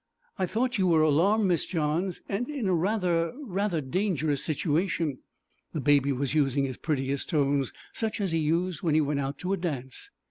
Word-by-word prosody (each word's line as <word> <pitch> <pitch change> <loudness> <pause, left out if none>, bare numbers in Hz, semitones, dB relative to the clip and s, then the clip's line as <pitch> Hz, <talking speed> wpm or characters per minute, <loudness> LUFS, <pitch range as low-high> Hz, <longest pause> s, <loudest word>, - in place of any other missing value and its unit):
'I 185 - +1
thought 245 +5 0
you 185 - +3
were 160 -3 +4
alarmed, 185 +9 +3
Miss 175 -4 +1
Johns, 165 +2 -1
and 220 +6 -2
in 275 -8 -2
a 185 - +2
rather 175 -2 +1
rather 200 - -1
dangerous 155 -1 0
situation.' 160 -1 0 0.5
The 155 - -2
Baby 140 0 +3
was 135 +1 -1
using 140 -2 +2
his 130 -2 -3
prettiest 140 -3 -2
tones, 140 -4 +1 0.2
such 220 -1 -2
as 195 -4 -1
he 165 - +1
used 165 +4 0
when 165 -5 +1
he 155 - +5
went 145 -1 0
out 140 0 -3
to 180 +5 -2
a - - 0
dance. 135 -8 -5
165 Hz, 185 wpm, -28 LUFS, 145-190 Hz, 0.5 s, he